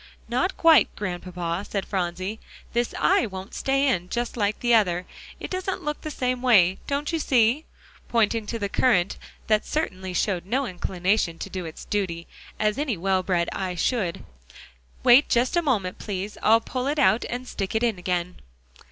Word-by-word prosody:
"Not 255 +10 0
quite, 320 -9 +6
Grandpapa," 180 -2 -4
said 195 -2 -2
Phronsie; 185 +3 -3 0.3
"this 240 0 0
eye 240 - +3
won't 190 +1 -8
stay 275 +1 +1
in 180 -9 0
just 240 +3 -2
like 205 -2 0
the 240 -1 +2
other. 180 -5 +3 0.3
It - - -7
doesn't 370 0 -3
look 300 0 -3
the 310 - -5
same 255 -3 -2
way, 195 -8 +4
don't 285 +2 -1
you 325 - +1
see?" 250 +1 +2 0.4
pointing 225 -1 +1
to 230 - -3
the 205 -2 -2
currant 195 -4 +2 0.3
that 215 -1 +2
certainly 190 - -3
showed 185 -3 0
no 265 +6 0
inclination 185 -2 -1
to 195 - -7
do 185 -2 -4
its 160 - -9
duty, 175 -5 -2 0.3
as 215 +3 +1
any 275 -9 -1
well 190 +2 +1
bred 175 -2 0
eye 185 -2 -3
should. 185 -2 -1 0.8
"Wait 250 +4 +7
just 245 +7 +2
a 345 - +4
moment, 210 - -1
please; 200 0 -4
I'll 225 +1 +5
pull 255 +2 -3
it 295 +2 0
out 245 -5 +4
and 250 +1 -4
stick 195 -2 -4
it 220 - +1
in 225 -6 +1
again." 180 0 -2
210 Hz, 180 wpm, -25 LUFS, 185-250 Hz, 0.8 s, Wait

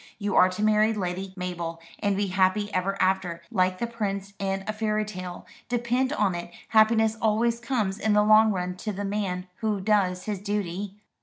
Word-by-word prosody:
You 205 -1 -2
are 185 - +6
to 185 +3 -3
marry 215 +1 +4
Lady 190 -1 -3
Mabel, 175 -2 -4 0.2
and 200 -1 0
be 205 - +1
happy 195 +2 +1
ever 195 +1 -1
after, 185 -3 0
like 185 -3 +2
the 235 - -1
prince 200 -4 -4
in 195 0 -2
a 215 - -1
fairy 215 0 0
tale. 185 -3 -7 0.2
Depend 245 +2 0
upon 205 -9 +1
it, 175 0 -6 0.2
happiness 220 0 +4
always 230 +2 +2
comes 220 -5 -1
in 215 - +1
the 210 0 +5
long 215 +1 +6
run 180 -2 -2
to 210 +3 -4
the 200 +1 -4
man 195 -3 -2
who 215 -2 -1
does 190 -2 +1
his 210 -3 -3
duty." 200 -1 -3
200 Hz, 185 wpm, -26 LUFS, 185-215 Hz, 0.2 s, are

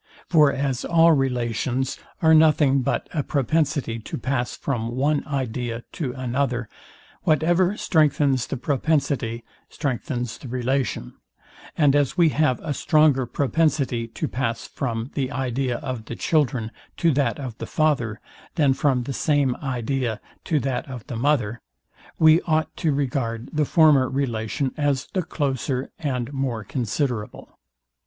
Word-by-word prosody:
For 150 -4 +5
as 135 -2 -2
all 165 0 +5
relations 130 -2 0 0.2
are 160 0 +6
nothing 150 -3 +5
but - - -1
a 155 - +1
propensity 145 -3 0
to 110 - -6
pass 125 0 -2
from 120 -3 -3
one 145 +3 +1
idea 120 -4 -3
to 145 -8 -3
another, 125 -1 -1 0.5
whatever 175 +5 +2
strengthens 145 -5 +2
the 135 - -3
propensity 140 -4 0 0.3
strengthens 125 -4 -3
the - - -9
relation; 125 - -2 0.6
and 145 -3 +4
as 145 +3 +1
we 170 -2 +5
have 150 -4 +1
a 155 -2 -2
stronger 145 -3 +3
propensity 140 -4 0
to 135 +7 -4
pass 115 -4 -2
from 115 -1 -4
the 135 -2 -2
idea 130 -1 -1
of 120 -4 -5
the 120 - -6
children 125 -8 0 0.3
to 170 - +3
that 135 -3 0
of 130 -5 -5
the - - -5
father, 135 -9 0 0.4
than 145 -4 +4
from 130 -2 +1
the 135 - -4
same 140 -2 +1
idea 125 -3 -2 0.3
to 155 - +1
that 130 0 -2
of 125 -4 -7
the 120 - -6
mother, 120 -3 0 0.6
we 160 +1 +6
ought 155 -1 0
to 160 - +1
regard 125 -4 -2
the 155 -1 +2
former 145 -4 +5
relation 130 -1 -2
as 145 -2 0
the 185 - +1
closer 135 -5 -2
and 135 -4 -2
more 130 -5 -2
considerable. 120 -1 -3
135 Hz, 140 wpm, -23 LUFS, 120-150 Hz, 0.6 s, are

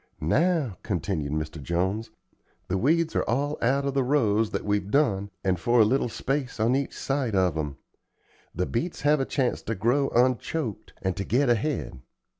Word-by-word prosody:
"Now," 150 - +1
continued 85 -6 -2
Mr. 75 0 -4
Jones, 95 +8 -1 0.6
"the 95 - +1
weeds 165 - +2
are - - +3
all 145 +5 0
out 135 +4 +2
of 140 - -1
the 135 -1 +2
rows 115 -6 +2
that - - -3
we've 105 -1 0
done, 100 -8 +2
and 95 -3 +1
for 120 +5 +3
a 110 - +7
little 125 +2 +1
space 135 +1 -3
on 115 +4 +3
each 140 0 -2
side 135 -6 -1
of 90 -4 +2
'em. 75 -3 -3 0.8
The 90 +2 0
beets 160 - -3
have 150 +1 +3
a 135 - 0
chance 130 -3 -1
to 110 - -3
grow 125 +8 +2
unchoked, 125 0 0
and 95 -1 0
to 100 - -1
get 125 +7 +2
ahead. 120 - -1
115 Hz, 180 wpm, -26 LUFS, 95-140 Hz, 0.8 s, a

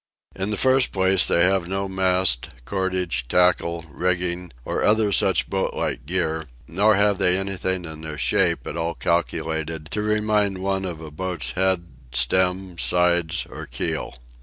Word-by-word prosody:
In 95 +1 -3
the 105 - -2
first 130 +2 +3
place, 95 -1 +3
they 85 - +4
have 95 -1 +2
no 95 +1 -2
mast, 95 -8 +2 0.2
cordage, 95 -8 -2
tackle, 85 -1 +2
rigging, 90 +2 -1
or - - -2
other 105 -1 +3
such 95 -3 +3
boat 95 -1 -2
like 60 - -3
gear; 80 -3 0 0.2
nor 100 +5 +3
have 100 -1 +3
they 90 0 +4
anything 95 -2 -2
in 80 -1 -7
their 80 -1 -6
shape 85 +7 +1
at - - -5
all 85 0 -2
calculated 80 0 -2
to 105 - -1
remind 105 -2 +1
one 95 0 -1
of 85 -3 -6
a 80 -1 -9
boat's 90 0 -3
head, 95 -2 0 0.3
stem, 90 +6 0
sides, 85 -1 +2
or - - -9
keel. - - -3
90 Hz, 160 wpm, -23 LUFS, 85-95 Hz, 0.3 s, they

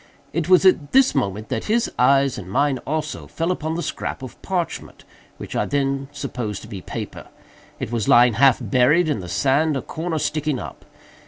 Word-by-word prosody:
It 170 +1 -2
was 185 0 +6
at 160 -6 +3
this 265 0 +5
moment 105 -5 -2
that - - -3
his 230 +2 +1
eyes, 135 0 +3
and 95 -2 -9
mine 140 +5 +1
also, 155 +1 -3
fell 165 +2 -2
upon 160 -2 -3
the 170 - -3
scrap 135 - -4
of 130 - -10
parchment, 180 -3 -4 0.3
which - - -8
I - - 0
then 135 -1 -1
supposed 115 -9 -5
to - - -10
be 100 -4 -7
paper. - - -7 0.5
It - - -4
was 115 -4 -1
lying 120 0 +6
half 130 +3 +5
buried 130 - +3
in 150 -7 0
the 90 -2 -8
sand, 140 - +2
a - - -3
corner 160 0 -4
sticking 150 -2 -1
up. - - -9
140 Hz, 190 wpm, -22 LUFS, 125-160 Hz, 0.5 s, was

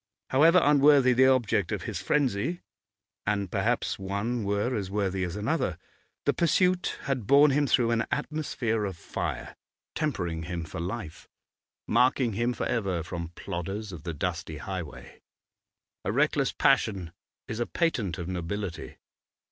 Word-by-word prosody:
However 165 +7 +6
unworthy 140 -3 +6
the 130 +2 +5
object 115 -7 +2
of - - -2
his - - -4
frenzy 145 - 0 0.7
and 100 -3 0
perhaps - - 0
one 100 +5 -2
were 100 +5 0
as 100 -4 -3
worthy 95 -2 -1
as 90 -1 -3
another 105 0 -1 0.5
the - - +3
pursuit 180 +2 +2
had 130 -6 -2
borne 140 +2 +7
him 145 +1 +2
through 120 -2 +3
an 115 0 +1
atmosphere 140 -7 -1
of 95 -4 -5
fire, - - -4 0.4
tempering 85 - -2
him 85 -1 -4
for 80 +3 -7
life, 90 -1 -6 0.6
marking 125 -2 +3
him 120 +4 0
for 120 - -3
ever 95 -7 -1
from 85 -1 -5
plodders 95 +3 -5
of 85 -4 -8
the 85 0 -5
dusty 85 0 -3
highway. 90 -2 -7 0.8
A - - -1
reckless 140 +2 +2
passion 100 -10 +1 0.3
is 115 -3 -4
a 120 - 0
patent 115 - 0
of 85 -2 -5
nobility. 90 -1 -4
105 Hz, 145 wpm, -28 LUFS, 90-130 Hz, 0.8 s, borne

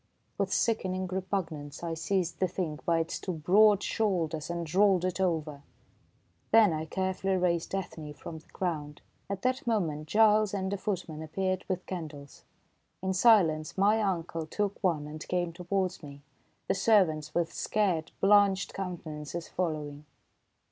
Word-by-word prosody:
With - - 0
sickening 185 -5 0
repugnance, 175 -6 -4
I 165 -1 -2
seized 170 +1 -1
the 185 - +2
Thing 165 -4 -3
by 170 -1 +3
its 165 - -4
two 185 - -3
broad 200 +6 +4
shoulders 170 -8 -1
and 170 -2 -4
rolled 190 -2 +4
it 185 0 -2
over. 155 -5 -1 0.9
Then 220 -6 +6
I 155 0 -3
carefully 190 +2 -1
raised 175 0 0
Ethne 160 -5 -5
from 160 +1 -8
the - - -24
ground. 150 -5 -4 0.3
At 195 -1 -4
that 255 0 0
moment 160 -9 0
Giles 215 +1 +4
and 190 0 -2
a - - -1
footman 180 -6 -4
appeared 185 +4 -2
with 185 -1 -2
candles. 155 -6 -7 0.6
In 190 0 0
silence 185 -7 +4
my 210 +3 +4
uncle 165 -5 -2
took 205 +4 -2
one 165 -6 +1
and 155 +1 -8
came 175 -2 -1
towards 180 +1 -2
me, 140 -2 -11 0.4
the - - +2
servants 180 -7 +2
with 170 -1 0
scared, 185 -7 0
blanched 200 -1 +4
countenances 170 -3 -5
following. 150 -4 -3
180 Hz, 150 wpm, -29 LUFS, 160-195 Hz, 0.9 s, Then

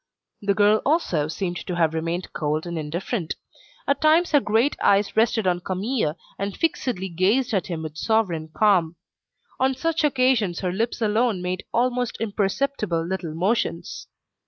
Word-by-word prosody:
The 200 -1 +1
girl 210 +1 +4
also 225 - +1
seemed 175 +2 -3
to 180 - -5
have 165 -2 +2
remained 165 +3 -3
cold 155 +1 -1
and 170 0 -4
indifferent. 165 +4 -3 0.5
At 280 - +1
times 320 +3 +4
her 290 - +6
great 230 +3 +1
eyes 200 0 +3
rested 220 -1 +2
on 180 -1 +2
Camille 190 - -1 0.2
and 200 0 -3
fixedly 250 - -1
gazed 200 +9 +1
at 195 - 0
him 165 -3 -4
with 155 -1 -7
sovereign 185 -9 0
calm. 180 -5 +3 0.6
On 265 0 +2
such 330 +4 -1
occasions 255 - +2
her 180 -2 -1
lips 230 +3 -1
alone 220 -1 +2
made 180 0 -3
almost 245 0 0
imperceptible 205 -4 -1
little 175 -3 -4
motions. 180 -2 -1
200 Hz, 155 wpm, -24 LUFS, 175-240 Hz, 0.6 s, her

